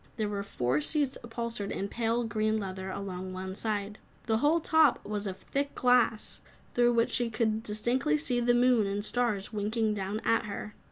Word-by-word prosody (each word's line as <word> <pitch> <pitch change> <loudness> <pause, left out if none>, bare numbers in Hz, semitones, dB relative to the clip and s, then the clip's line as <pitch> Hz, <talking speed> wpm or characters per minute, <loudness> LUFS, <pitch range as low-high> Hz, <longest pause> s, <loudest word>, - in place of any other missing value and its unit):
There 215 -2 -1
were 205 -1 -2
four 130 -7 0
seats 285 - 0
upholstered 230 -3 -4
in 195 - -2
pale, 230 +2 0
green 215 -1 0
leather, 190 -2 -4
along 185 -1 -5
one 190 0 -5
side. 210 0 -3 0.3
The 220 -2 +2
whole 300 +6 +3
top 315 -4 +3
was 210 0 -3
of 190 -1 -4
thick 280 +6 -3
glass, 245 -3 +2 0.3
through 240 0 +4
which 230 0 +2
she 240 -2 +1
could 220 -1 0
distinctly 215 - 0
see 240 +12 -1
the 240 0 +3
moon 245 -4 +4
and 200 +1 -2
stars 220 -4 0
winking 215 +1 0
down 200 +1 -3
at 230 0 +3
her. 210 0 -6
215 Hz, 180 wpm, -30 LUFS, 200-240 Hz, 0.3 s, through